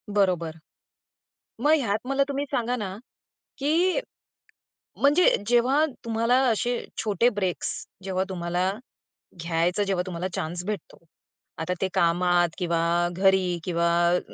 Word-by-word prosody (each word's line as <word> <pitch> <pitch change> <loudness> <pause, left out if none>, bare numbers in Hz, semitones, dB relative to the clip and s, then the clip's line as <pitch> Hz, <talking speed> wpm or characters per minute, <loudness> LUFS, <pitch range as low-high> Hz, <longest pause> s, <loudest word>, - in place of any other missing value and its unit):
बरोबर. 175 -5 +1 1.1
मग 300 - +4
ह्यात 215 -5 0
मला 275 +1 +2
तुम्ही 280 +1 -2
सांगा 245 -2 0
ना, 195 -4 -5 0.6
की 335 - +2 1.0
म्हणजे 295 +6 +5
जेव्हा 255 +6 +3 0.2
तुम्हाला 230 +2 +2
असे 240 +2 +1 0.2
छोटे 220 +3 +2
ब्रेक्स 195 -6 -2 0.3
जेव्हा 190 0 -1
तुम्हाला 180 0 -1 0.7
घ्यायचं 170 +4 +1
जेव्हा 190 -2 0
तुम्हाला 180 0 -3
चान्स 175 +3 -3
भेटतो, 210 -1 -5 0.6
आता 160 +3 -2
ते 190 - +2
कामात 175 -1 +2
किंवा 170 -3 0 0.4
घरी 190 -2 +2
किंवा 170 -1 0 0.3
अ, - - 0
190 Hz, 115 wpm, -25 LUFS, 175-240 Hz, 1.1 s, म्हणजे